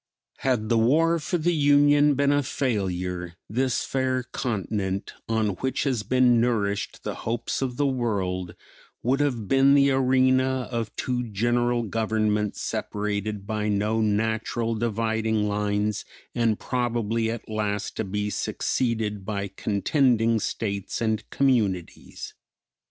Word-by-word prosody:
Had 120 -5 0
the 115 - +3
war 165 +8 +3
for 175 +3 -1
the 175 +2 +1
Union 145 -1 +4
been 140 +1 +2
a 145 0 +3
failure 90 - -2
this 120 +2 0
fair 130 -1 0
continent 100 -5 -3 0.2
on 110 -2 +1
which 130 0 -1
has 130 -6 0
been 120 +2 +3
nourished 105 -4 -1
the - - -3 0.2
hopes 120 +3 -2
of 125 -2 -2
the 145 - +2
world 100 -9 -1 0.5
would 130 +4 +2
have 125 -8 0
been 135 +3 +5
the 140 0 +5
arena 130 0 +2
of 115 -3 -2
two 125 -1 -1
general 120 +3 +1
governments 110 -1 0
separated 105 0 -3
by 105 0 -2
no 105 +2 +1
natural 110 +2 0
dividing 110 -1 0
lines 105 0 -1 0.3
and 115 -3 +1
probably 115 -2 -1
at 115 0 -5
last 105 -1 -2
to - - 0
be 105 +1 -2
succeeded 110 -5 -1
by 100 -1 -3
contending 115 +3 +1
states 100 -2 -3
and 110 -2 -1
communities. 105 -11 -1
115 Hz, 130 wpm, -25 LUFS, 105-130 Hz, 0.5 s, been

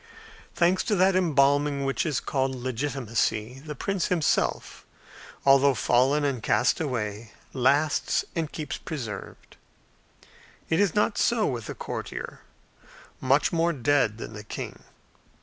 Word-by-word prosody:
Thanks 175 +2 +3
to 210 - +1
that 190 0 +3
embalming 145 -4 +2
which 135 +4 -1
is 150 -4 0
called 135 -1 -1
legitimacy, 125 -2 -2
the 150 +1 -8
prince 195 +6 -1
himself, 170 -5 0 0.6
although 135 0 +5
fallen 130 +6 +2
and 135 -5 -1
cast 120 +2 +2
away, 110 -6 -4 0.2
lasts 140 +4 +2
and 160 -3 -2
keeps 150 -3 -5
preserved; 115 -10 -7 1.1
it 160 - +3
is 200 -4 +2
not 210 0 +1
so 235 -3 +2
with 120 -5 -3
the - - -6
courtier, - - -6 0.8
much 135 +5 +2
more 170 +1 +2
dead 140 -6 +1
than 115 - -8
the 105 0 -8
king. 105 - -7
140 Hz, 130 wpm, -26 LUFS, 125-160 Hz, 1.1 s, although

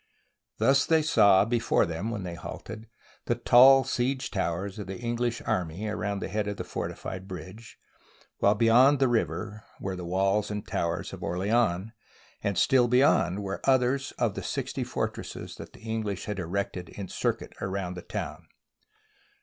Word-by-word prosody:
Thus 135 +5 +3
they 160 -1 +4
saw 105 -10 +5
before 115 +1 +2
them, 85 +6 -3
when 105 -4 -4
they 90 -2 -5
halted, 110 +5 -8 0.4
the - - +1
tall 135 +2 +7
siege 130 +1 -1
towers 95 +1 -2
of 100 - -6
the 95 0 -5
English 120 0 -2
army 90 +3 -2
around 105 -1 -2
the - - -2
head 105 -1 -2
of 100 0 -3
the - - -4
fortified 95 +1 -5
bridge, 95 +5 -9 0.6
while 100 +1 +4
beyond 120 +6 +5
the 135 0 +3
river 105 -1 -1 0.2
were 95 -1 -3
the 90 - -6
walls 95 +4 +1
and 105 -1 -5
towers 85 0 -2
of - - -8
Orleans, 100 +1 0 0.5
and 100 -2 -1
still 125 -2 +4
be 125 +1 +3
yond 95 -2 +2
were 100 0 -4
others 130 +1 +2
of - - +1
the - - -5
sixty - - -3
fortresses - - -4
that - - -10
the - - -16
English 110 -3 -3
had 105 -2 -4
erected 90 0 -3
in 100 -2 -7
circuit - - -2
about 95 -2 -3
the 90 - -7
town. - - -6
105 Hz, 165 wpm, -28 LUFS, 95-120 Hz, 0.6 s, tall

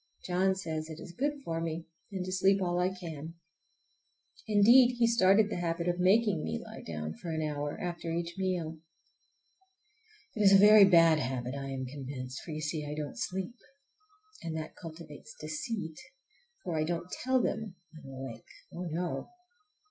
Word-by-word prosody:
John 185 +1 +2
says 160 -4 -4
it 160 0 -8
is 175 - -9
good 285 +4 -2
for 165 0 -2
me, 165 0 -3 0.3
and 190 -2 -3
to 185 - -4
sleep 195 +1 +3
all 175 -2 0
I 180 +1 +2
can. 165 -4 -7 1.1
Indeed, 240 +4 +6
he 235 - +4
started 215 -2 +4
the - - -2
habit 170 -1 -1
by 175 - +2
making 195 -1 +3
me 80 -1 -2
lie - - -10
down 75 -1 -5
for 170 - -8
an 160 -1 -1
hour 145 -1 -3
after 170 -1 -4
each 170 +1 -2
meal. 175 -4 -2 1.6
It 215 - -2
is 200 -1 +7
a - - +10
very 210 +1 +9
bad 165 -4 +6
habit, 125 -1 -3
I 140 -1 -5
am 130 -1 -3
convinced, 130 -1 -6
for, - - -12
you 155 -1 -4
see, 155 0 -2
I 150 0 -5
don't 150 -2 -4
sleep. 190 +6 -4 0.8
And 160 -1 -4
that 155 0 -6
cultivates 165 +4 -10
deceit, 160 +1 -4 0.6
for 175 -3 -3
I - - +2
don't 170 +2 -3
tell 260 +1 +1
them 220 -4 -2 0.2
I'm 155 -4 -12
awake,—oh, 135 +7 -8
no! 170 +2 -3
170 Hz, 170 wpm, -31 LUFS, 155-190 Hz, 1.6 s, a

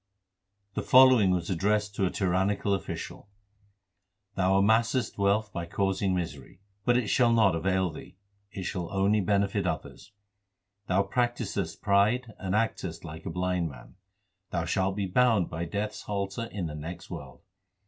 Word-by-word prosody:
The - - -2
following 130 -6 +6
was 90 0 0
addressed 105 +3 0
to 95 -1 +1
a - - -1
tyrannical 95 +2 0
official: 100 +1 -5 1.0
Thou 95 0 +2
amassest 110 +4 +2
wealth 100 +2 +1
by 85 -2 -4
causing 95 +1 0
misery; 80 -4 -5 0.2
But 120 +3 +3
it 125 - 0
shall 120 +3 +3
not 110 -5 +4
avail 95 +1 0
thee; 75 - -12 0.3
it 95 - -6
shall 90 -2 -4
only 100 +2 +2
benefit 100 +1 +1
others. 95 - -5 0.8
Thou 95 +2 +2
practisest 105 -5 -2
pride 110 +4 +2
and 95 +1 -2
actest 95 -7 -2
like 80 0 -8
a - - -2
blind 90 -1 -1
man; 65 -3 -13 0.6
Thou 85 -2 -2
shalt 95 +3 0
be 100 -1 -1
bound 110 -1 +2
by 85 +1 -3
Death 100 +5 -2
s - - -9
halter 100 +2 -3
in 100 -5 -5
the 80 - -5
next 80 +4 -8
world. 65 -2 -9
95 Hz, 155 wpm, -28 LUFS, 90-105 Hz, 1.0 s, following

